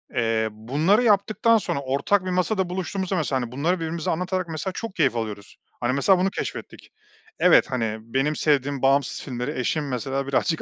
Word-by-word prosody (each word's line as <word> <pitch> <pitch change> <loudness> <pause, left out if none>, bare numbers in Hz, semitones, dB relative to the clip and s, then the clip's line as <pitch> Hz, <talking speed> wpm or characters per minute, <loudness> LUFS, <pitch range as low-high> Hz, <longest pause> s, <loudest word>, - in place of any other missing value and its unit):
eee, 115 -2 +1
bunları 145 - +1
yaptıktan 215 +1 +3
sonra 195 - -2
ortak 140 +9 +1
bir - - -2
masada 185 +1 0
buluştuğumuzda 190 +1 -3
mesela, 140 -6 0
hani, 120 -1 -5
bunları 150 +8 0
birbirimize 165 0 -2
anlatarak 180 +2 -2
mesela 160 +4 -3
çok 225 +1 -6
keyif 140 -8 +2
alıyoruz. 105 -3 -5 0.2
Hani, 120 +1 0
mesela 180 +7 +3
bunu 190 +2 +2
keşfettik. - - -6 0.5
Evet, - - +5
hani, 115 -3 -1
benim 135 +7 -1
sevdiğim 140 -3 +1
bağımsız 135 0 +2
filmleri 125 -1 -4
eşim 145 +3 -1
mesela 135 +2 -3
birazcık 155 +4 0
145 Hz, 170 wpm, -24 LUFS, 130-185 Hz, 0.5 s, Evet